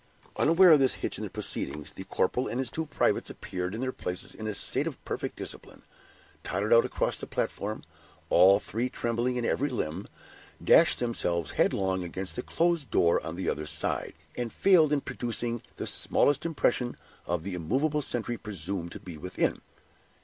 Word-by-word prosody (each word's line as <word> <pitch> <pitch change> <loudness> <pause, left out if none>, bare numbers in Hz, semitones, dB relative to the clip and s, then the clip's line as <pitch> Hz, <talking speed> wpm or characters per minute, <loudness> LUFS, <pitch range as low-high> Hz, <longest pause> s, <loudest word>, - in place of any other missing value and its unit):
Unaware 170 +3 +6
of 155 - +8
this 130 -1 +3
hitch - - -3
in - - -4
the - - -4
proceedings, 75 +1 -3
the 95 - -9
corporal 125 +9 0
and 120 - -3
his 130 -2 -2
two 160 0 -3
privates 145 - +1
appeared 90 +2 -5
in 115 - -4
their 130 0 -1
places 90 -6 -5
in 110 - -6
a 105 - -1
state - - +1
of - - -5
perfect - - -4
discipline, - - -6 0.6
tottered 100 +3 0
out 115 - +7
across - - -1
the - - -7
platform, 105 +2 -3 0.5
all 95 +3 +7
three 115 +4 -2
trembling 120 0 -1
in 120 -1 -1
every 145 +5 +1
limb, 95 - -3 0.6
dashed - - +6
themselves 90 -9 -1
headlong 95 -1 +1
against 90 +2 -4
the - - -2
closed 170 0 0
door 85 - +3
on 80 - -5
the 95 - -4
other 75 +1 -2
side, - - -2 0.2
and 120 -2 -3
failed 175 -6 +5
in 145 -2 +2
producing 120 -2 -3
the - - -4
smallest 145 +3 +2
impression 125 -6 0 0.3
on 85 -2 -1
the 95 +1 -4
immovable 135 - 0
sentry 120 -3 -2
presumed 95 -3 -4
to - - -8
be 85 -4 -8
within. 90 +4 -1
115 Hz, 180 wpm, -28 LUFS, 90-130 Hz, 0.6 s, of